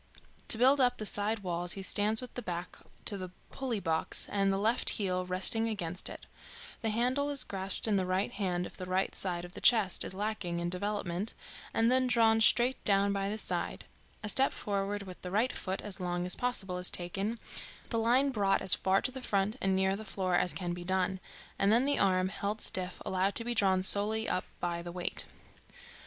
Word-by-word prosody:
To - - +4
build 265 +4 +4
up 245 -1 +3
the 215 - -5
side 205 +1 +1
walls 175 -1 -1
he 195 - -6
stands 210 +4 +2
with 250 - -9
the 245 - -5
back 175 -3 -6 0.3
to 200 - +3
the 185 -1 -6 0.2
pulley 250 -5 -3
box 165 -3 +2
and 195 -1 +1
the 195 - 0
left 225 +5 +3
heel 185 -3 -2
resting 210 +5 +5
against 180 -5 -4
it; - - -10 0.6
the 225 - -1
handle 250 +6 0
is 280 -3 +1
grasped 195 +2 -3
in 210 -2 +2
the 185 - 0
right 185 +2 0
hand 180 -3 -2
if - - -9
the 185 - -7
right 185 +1 0
side 175 -2 -2
of 175 - -13
the - - -9
chest 215 -6 +4
is - - -6
lacking 200 -4 -3
in 170 0 -3
development, 200 0 -3 0.4
and 230 +2 +2
then 255 0 +3
drawn 225 -2 +3
straight 245 +3 +3
down 200 0 +3
by 195 0 -2
the 215 - -3
side; - - -2 0.4
a 210 - -2
step 270 +5 +3
forward 200 0 -3
with 185 -2 -11
the 180 - -6
right 220 +7 0
foot, 190 +1 -3
as 205 -1 -2
long 175 -1 -2
as 180 - -1
possible, 200 -7 -2
is 180 - +8
taken, 195 +6 -2 0.5
the 230 - 0
line 250 +5 +2
brought 200 -6 +1
as 190 - +6
far 190 +1 +1
to 255 - 0
the 260 0 -8
front 200 -1 0
and 190 -1 +1
near 190 0 +1
the 215 - -7
floor 190 -4 -3
as 175 0 +3
can 175 -2 -2
be 175 0 -7
done, 190 +1 -1 0.4
and 200 +1 +3
then 235 +4 +3
the 285 - +2
arm, 185 -1 +2
held 205 +2 -4
stiff, 185 -3 0
allowed 190 +1 0
to 230 - +1
be 240 - -1
drawn 190 -4 +2
solely 215 +3 +2
up 185 - -1
by 170 -1 -3
the 175 0 -8
weight. 180 0 0
195 Hz, 215 wpm, -31 LUFS, 185-225 Hz, 0.6 s, is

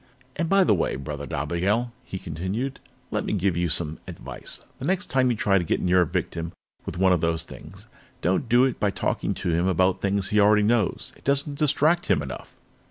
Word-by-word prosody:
"And 165 -1 -1
by 195 0 +5
the 175 - +4
way, 90 - 0
Brother 70 +1 -6
Dobigel," 95 - 0
he 95 - -6
continued, 95 - -4 0.3
"let - - -1
me - - -2
give 95 -3 +1
you 85 0 0
some 80 0 -1
advice. - - -4
The - - -5
next 190 +2 -1
time 130 -1 +3
you 120 - 0
try 100 -1 +3
to - - -1
get 80 - 0
near 90 0 +3
a 85 - +2
victim 85 +2 -3 0.3
with - - -4
one 95 0 +4
of 90 - +1
those 80 -1 0
things, - - -12 0.4
don't 95 +8 +1
do 120 +2 +5
it 130 -2 0
by 105 - +2
talking 100 - -1
to - - -3
him 85 +3 +1
about 95 0 +2
things 100 0 0
he 105 -1 +3
already 105 +1 +5
knows. 110 -2 0
It - - -23
doesn't 140 +1 0
distract 155 +3 +2
him 70 - +2
enough." 65 -3 -8
95 Hz, 215 wpm, -25 LUFS, 85-120 Hz, 0.4 s, by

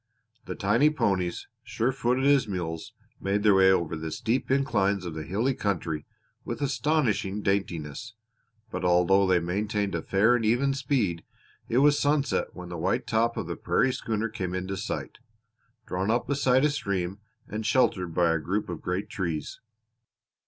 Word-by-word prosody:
The - - -5
tiny 110 +8 +3
ponies, 95 - -1 0.2
sure 120 +4 -1
footed 130 0 0
as 140 -4 +4
mules, 85 -5 -4 0.3
made 100 +1 -1
their 105 -2 +6
way 95 0 +6
over 85 -3 +1
the 80 0 -5
steep 115 +10 -1
inclines 100 -8 +1
of 85 - -4
the 80 - -5
hilly 105 - 0
country 85 - -2 0.4
with - - -5
astonishing 125 -7 0
daintiness, 95 +1 -2 0.6
but 90 0 -4
although 90 +2 +4
they 90 -1 +4
maintained 100 +3 -1
a - - -1
fair 110 +5 +3
and 120 - -1
even 120 +5 +2
speed 125 - -1 0.5
it 120 - +1
was 145 0 +4
sunset 145 -1 +1
when 90 -1 -8
the 85 -1 -6
white - - 0
top 115 +1 +1
of - - -2
the - - -4
prairie 130 - +1
schooner 110 -2 -2
came 95 -5 -4
into 95 +1 -3
sight, - - -5 0.7
drawn 95 +3 -2
up 120 +2 +1
beside 135 -1 +2
a 150 - +3
stream 100 -7 -2 0.3
and 110 +1 -4
sheltered 95 -9 +1
by 85 -2 +3
a 80 - 0
group 95 +6 -2
of 85 - -5
great 90 +3 -2
trees. 85 -8 -4
100 Hz, 165 wpm, -27 LUFS, 90-120 Hz, 0.7 s, their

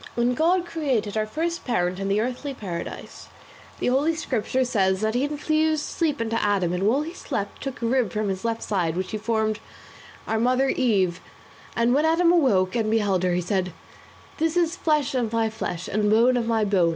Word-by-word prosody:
"When 240 +1 +2
God 345 +6 +2
created 265 - -1
our 215 0 0
first 335 +8 -3
parent 180 -6 -1
in 195 - -2
the 200 +1 +1
earthly 255 +4 -3
paradise, 175 -7 -7 0.5
the - - -3
Holy 285 +6 +2
Scripture 260 -3 -1
says 190 -5 +1
that 220 0 0
he 245 +3 +1
infused 310 +1 0
sleep 310 -4 -1
into 230 0 -1
Adam 195 -4 +1
and 185 +3 0
while 270 +7 +2
he 330 +2 -7
slept 200 - -5
took 270 -3 -5
a - - +1
rib 240 -4 +1
from 215 0 -1
his 190 -1 -3
left 230 -1 -2
side 180 -6 0
of - - -6
which 185 0 -3
he 215 - -3
formed 220 0 0 0.7
our 220 - -1
mother 255 +3 +2
Eve, 190 -7 +1 0.5
and 235 +1 +2
when 290 +3 +3
Adam 335 +2 +4
awoke 235 - +3
and 225 -2 0
beheld 205 -4 +1
her 180 -1 +1
he 180 - 0
said, 180 -1 -1 0.7
'This 325 +2 +1
is 340 0 +2
flesh 300 -7 +1
of 240 -4 0
my 225 -1 +1
flesh, 180 -5 -4
and 210 +1 0
bone 235 +4 +4
of 235 -2 0
my 225 -2 +2
bone. 190 -4 +3
230 Hz, 205 wpm, -24 LUFS, 200-275 Hz, 0.7 s, Adam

